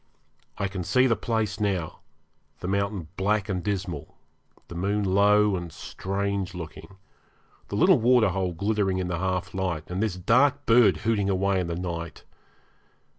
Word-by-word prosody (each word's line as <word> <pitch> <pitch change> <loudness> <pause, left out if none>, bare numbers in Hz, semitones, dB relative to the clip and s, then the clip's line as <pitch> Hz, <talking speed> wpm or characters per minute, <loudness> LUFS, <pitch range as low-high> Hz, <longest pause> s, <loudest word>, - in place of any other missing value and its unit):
I 100 - -1
can 95 -1 -5
see 125 +9 +3
the 115 -3 +3
place 110 -3 -2
now 95 -6 -2 0.6
the - - -5
mountain 100 -3 -2
black 105 +1 +1
and 90 -4 -2
dismal, 95 -7 -4 0.5
the - - -9
moon 100 +4 -1
low 100 +1 +4
and 85 -2 -5
strange 100 +2 -3
looking, 85 +2 -9 0.7
the - - -5
little - - +5
waterhole 105 -7 +2
glittering 100 +1 0
in 90 -1 -2
the 85 -2 -2
half 95 -1 -2
light, 90 -4 -3
and 90 +2 -2
this 110 -4 0
dark 130 +10 +2
bird 115 -7 +5
hooting 105 -3 +1
away 95 0 +1
in 90 - -2
the 85 - -3
night. 85 -2 -5
95 Hz, 155 wpm, -26 LUFS, 90-105 Hz, 0.7 s, little